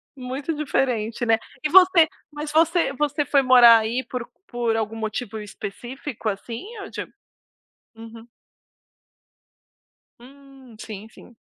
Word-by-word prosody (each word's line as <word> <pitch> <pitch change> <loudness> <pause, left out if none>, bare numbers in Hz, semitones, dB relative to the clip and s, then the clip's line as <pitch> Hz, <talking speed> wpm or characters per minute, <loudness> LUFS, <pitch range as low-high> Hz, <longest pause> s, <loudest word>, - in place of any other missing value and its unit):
muito 270 +4 -4
diferente, 245 -6 -1
né. 225 -1 +3 0.3
E 305 - 0
você 365 -1 +6 0.2
mas 295 0 -6
você 330 -1 +2
você 295 +1 -1
foi 280 0 +3
morar 245 -3 +8
aí 230 +4 -2
por 250 -2 -5 0.2
por 240 - -1
algum 220 0 -3
motivo 220 0 -4
específico, 230 +4 -6
assim, 225 +4 -6 0.2
ou 395 - -8
de - - -5 0.9
uhum. 225 0 -12 1.9
Hum, 270 -1 -16
sim, 215 -1 -8
sim. 235 +1 -17
250 Hz, 120 wpm, -23 LUFS, 225-285 Hz, 1.9 s, morar